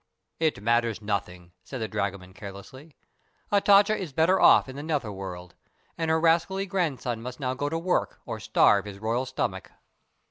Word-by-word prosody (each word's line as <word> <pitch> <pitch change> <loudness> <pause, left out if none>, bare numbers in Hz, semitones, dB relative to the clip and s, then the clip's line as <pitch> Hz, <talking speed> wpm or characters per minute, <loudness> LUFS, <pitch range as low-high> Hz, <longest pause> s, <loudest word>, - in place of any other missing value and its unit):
"It 155 -11 0
matters 115 0 +1
nothing," 90 -4 -4
said 130 - -7
the 110 - -2
dragoman, 100 -3 -4
carelessly. 105 - -11 0.6
"Hatatcha 205 +1 +5
is 180 -9 -6
better 165 +6 +3
off - - +6
in 130 - -9
the 140 - -6
nether 145 -8 -2
world, 90 -3 -8 0.4
and 165 -1 -2
her 160 0 +3
rascally 170 +4 +2
grandson 150 - -2
must 125 +1 -7
now 130 -1 -1
go 145 +3 -2
to 165 - -2
work 175 +2 -1
or - - -5
starve 100 -1 +3
his 100 -1 -8
royal 115 +5 -1
stomach." 130 - -3
130 Hz, 170 wpm, -26 LUFS, 105-165 Hz, 0.6 s, off